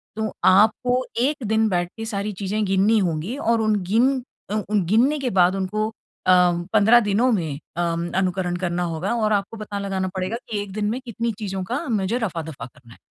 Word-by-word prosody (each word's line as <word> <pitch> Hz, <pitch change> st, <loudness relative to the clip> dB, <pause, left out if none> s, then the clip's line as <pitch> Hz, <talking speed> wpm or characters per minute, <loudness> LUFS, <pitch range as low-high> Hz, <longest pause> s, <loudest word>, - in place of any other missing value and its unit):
तो 220 Hz, -2 st, -2 dB
आपको 245 Hz, +6 st, +4 dB
एक 275 Hz, +1 st, 0 dB
दिन 220 Hz, +1 st, +2 dB
बैठ 175 Hz, -1 st, 0 dB
के 225 Hz, -, -5 dB
सारी 210 Hz, -1 st, -3 dB
चीज़ें 205 Hz, +2 st, -1 dB
गिननी 195 Hz, +3 st, +3 dB
होंगी 180 Hz, -, -2 dB
और 230 Hz, -4 st, +1 dB
उन 215 Hz, -1 st, +2 dB
गिन 250 Hz, +4 st, +2 dB, 0.3 s
अ, 210 Hz, -, -2 dB
उन 210 Hz, -3 st, +2 dB
गिनने 240 Hz, -, +3 dB
के 260 Hz, -, -1 dB
बाद 185 Hz, -2 st, +3 dB
उनको 215 Hz, +3 st, -1 dB, 0.4 s
अम, 180 Hz, -1 st, +4 dB
15 220 Hz, +3 st, +6 dB
दिनों 225 Hz, +4 st, +2 dB
में 160 Hz, -8 st, -1 dB, 0.2 s
अम, 170 Hz, 0 st, -1 dB
अनुकरण 185 Hz, -1 st, 0 dB
करना 180 Hz, -1 st, -1 dB
होगा 185 Hz, +8 st, -2 dB
और 215 Hz, -2 st, +1 dB
आपको 200 Hz, +2 st, -1 dB
पता 210 Hz, -1 st, -5 dB
लगाना 195 Hz, -1 st, -2 dB
पड़ेगा 190 Hz, +5 st, -2 dB
कि 210 Hz, -2 st, -2 dB
एक 200 Hz, -2 st, -7 dB
दिन 210 Hz, 0 st, -1 dB
में 240 Hz, +4 st, -2 dB
कितनी 235 Hz, 0 st, -2 dB
चीज़ों 195 Hz, -3 st, -3 dB
का 250 Hz, -, -3 dB
मुझे 210 Hz, 0 st, 0 dB
रफा-दफा 165 Hz, -, -4 dB
करना 125 Hz, -2 st, -16 dB
है। -, -, -19 dB
205 Hz, 195 wpm, -23 LUFS, 185-225 Hz, 0.4 s, 15